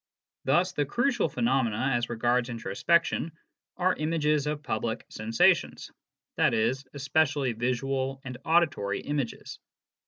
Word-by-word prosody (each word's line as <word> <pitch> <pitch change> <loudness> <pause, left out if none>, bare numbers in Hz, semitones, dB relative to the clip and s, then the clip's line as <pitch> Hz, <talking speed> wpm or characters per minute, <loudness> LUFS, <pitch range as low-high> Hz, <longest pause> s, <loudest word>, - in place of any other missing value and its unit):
Thus 175 +7 +3
the 150 - 0
crucial 240 - +1
phenomena 125 -1 0
as 120 0 0
regards 120 +1 +1
introspection 135 - 0 0.4
are 185 0 +2
images 150 -2 0
of 150 0 -3
public 110 -1 -3
sensations, 110 +1 +1 0.5
i.e., 110 +3 +3 0.2
especially 140 -2 +1
visual 130 +3 -1
and 125 -1 -7
auditory 160 - +1
images. 145 -5 -4
135 Hz, 105 wpm, -28 LUFS, 120-155 Hz, 0.5 s, Thus